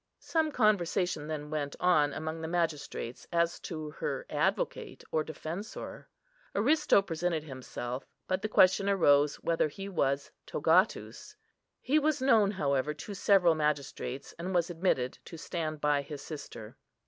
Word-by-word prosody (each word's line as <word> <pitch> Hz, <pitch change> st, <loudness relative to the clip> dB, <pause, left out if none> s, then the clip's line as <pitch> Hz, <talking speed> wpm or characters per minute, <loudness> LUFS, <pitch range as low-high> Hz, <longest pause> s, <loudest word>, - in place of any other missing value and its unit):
Some 320 Hz, -2 st, 0 dB
conversation 185 Hz, -, +1 dB
then 150 Hz, -1 st, -5 dB
went 145 Hz, -2 st, -2 dB
on 155 Hz, -5 st, +4 dB
among 160 Hz, +2 st, -4 dB
the 160 Hz, -, -3 dB
magistrates 160 Hz, -7 st, -2 dB
as 170 Hz, -1 st, +1 dB
to 155 Hz, -3 st, -6 dB
her -, -, -3 dB
advocate -, -, -1 dB
or 155 Hz, -, +1 dB
defensor. 160 Hz, +6 st, -7 dB, 0.5 s
Aristo 290 Hz, 0 st, +4 dB
presented 165 Hz, -2 st, -1 dB
himself, 130 Hz, -2 st, -6 dB, 0.2 s
but 185 Hz, +1 st, 0 dB
the 215 Hz, -, -2 dB
question 195 Hz, 0 st, +5 dB
arose 145 Hz, -7 st, +4 dB
whether 165 Hz, -2 st, +2 dB
he 195 Hz, +7 st, -7 dB
was 140 Hz, -7 st, 0 dB, 0.2 s
togatus. 175 Hz, +7 st, +1 dB, 0.5 s
He 290 Hz, +5 st, +3 dB
was 305 Hz, -1 st, +1 dB
known, 230 Hz, -6 st, +4 dB
however, 150 Hz, -6 st, 0 dB
to 200 Hz, +7 st, -7 dB
several 190 Hz, -3 st, +4 dB
magistrates, 145 Hz, -3 st, -2 dB
and 180 Hz, +2 st, -3 dB
was 175 Hz, 0 st, +2 dB
admitted 160 Hz, -8 st, 0 dB
to 165 Hz, -, -9 dB
stand 155 Hz, -2 st, -4 dB
by 145 Hz, -1 st, +2 dB
his 140 Hz, 0 st, -8 dB
sister. 140 Hz, -8 st, -8 dB
165 Hz, 140 wpm, -30 LUFS, 150-195 Hz, 0.5 s, question